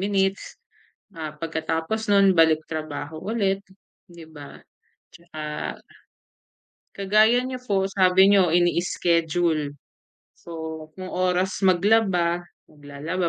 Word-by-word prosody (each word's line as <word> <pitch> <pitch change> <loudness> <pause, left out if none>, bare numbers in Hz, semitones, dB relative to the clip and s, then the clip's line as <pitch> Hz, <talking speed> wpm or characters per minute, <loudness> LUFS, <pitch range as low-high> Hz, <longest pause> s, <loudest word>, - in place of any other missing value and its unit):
minutes, 195 0 -1 0.6
ah, 155 -4 -7
pagkatapos 165 +6 -3
no'n 200 -1 +5
balik 160 -2 +3
trabaho 155 0 -6
ulit 200 -3 -1 0.5
'di 170 -2 -13
ba? 145 -2 -11 0.6
'Tsaka 170 -2 -11 1.6
kagaya 215 +5 +3
nyo 255 0 -5
po, 195 -5 0
sabi 190 0 +4
niyo 195 -4 +4
ini-schedule, 170 -3 +1 0.6
so 160 -2 -8
kung 185 -1 -8
oras 185 +1 0
maglaba, 180 -2 +2 0.2
maglalaba 150 +5 -4
175 Hz, 95 wpm, -24 LUFS, 160-195 Hz, 1.6 s, no'n